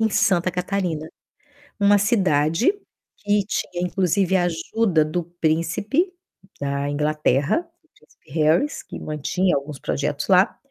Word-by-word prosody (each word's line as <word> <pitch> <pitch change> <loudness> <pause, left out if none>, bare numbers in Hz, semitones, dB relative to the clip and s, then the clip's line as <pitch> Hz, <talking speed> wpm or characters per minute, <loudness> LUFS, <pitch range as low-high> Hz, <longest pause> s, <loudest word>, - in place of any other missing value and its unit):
em 220 -1 +2
Santa 185 -2 +2
Catarina, 180 -3 -2 0.7
uma 205 0 +5
cidade 190 - +2 0.4
que 205 0 +1
tinha, 175 -4 -3
inclusive, 190 +1 +1
a 180 - +3
ajuda 175 -1 +1
do 170 +3 -2
príncipe 175 - 0 0.5
da 140 0 -2
Inglaterra, 150 - +1 0.3
príncipe 150 - -25
Harrys, 160 - +2
que - - -9
mantinha 155 +4 -1
alguns 140 0 -4
projetos 145 +1 -2
lá, 190 +3 +4
175 Hz, 120 wpm, -22 LUFS, 150-200 Hz, 0.7 s, uma